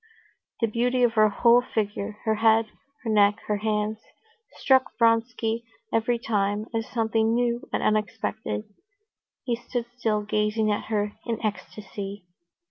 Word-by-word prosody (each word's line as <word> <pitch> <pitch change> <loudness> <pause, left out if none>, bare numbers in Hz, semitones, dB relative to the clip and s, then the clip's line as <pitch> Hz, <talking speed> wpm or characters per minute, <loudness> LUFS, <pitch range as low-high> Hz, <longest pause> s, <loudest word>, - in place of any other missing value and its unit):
The 230 - +3
beauty 245 +3 +1
of 240 -2 +3
her 215 -1 +5
whole 235 +4 +5
figure, 210 -3 -3
her 220 - +3
head, 225 +1 +4 0.4
her 230 - -3
neck, 205 -1 +5
her 210 - 0
hands, 215 0 -1 0.5
struck 265 -1 +2
Vronsky 230 0 +1 0.3
every 225 +2 +2
time 205 -2 -1
as 225 -1 -2
something 225 -1 +1
new 240 0 -1
and - - -1
unexpected. 215 - -1 0.8
He 240 -3 0
stood 240 0 -4
still, 220 -4 0
gazing 210 +1 +1
at 205 - -2
her 210 -1 -1
in 230 -2 -1
ecstasy. 205 -2 -5
220 Hz, 135 wpm, -26 LUFS, 210-230 Hz, 0.8 s, her